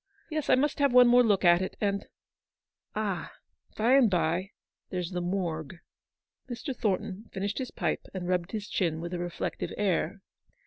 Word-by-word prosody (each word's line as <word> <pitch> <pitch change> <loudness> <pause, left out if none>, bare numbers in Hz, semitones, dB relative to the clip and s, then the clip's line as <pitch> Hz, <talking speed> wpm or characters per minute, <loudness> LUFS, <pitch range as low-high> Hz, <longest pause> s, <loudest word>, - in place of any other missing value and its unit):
Yes, 310 -2 -2
I - - +7
must 290 +3 0
have 280 -2 +4
one 250 -1 +8
more 245 +1 +7
look 205 -5 +3
at 175 +1 +6
it, 190 - -4
and 200 -1 -1 0.4
— - - -49
Ah! - - -2 0.4
by 250 +5 +5
the 240 - +6
bye, 175 0 0 0.4
there's 180 -1 -3
the 180 -1 -2
Morgue! 175 -3 -3 0.7
p 250 - -4
Mr. 270 +2 -5
Thornton 210 -1 -2
finished 200 +4 -3
his 260 - -3
pipe - - -2
and 185 -2 -5
rubbed 180 -1 0
his 210 -2 -4
chin 165 -4 0
with 170 +2 -5
a 175 - -2
reflective 175 -1 -3
air. 195 -1 0
195 Hz, 180 wpm, -29 LUFS, 175-235 Hz, 0.7 s, one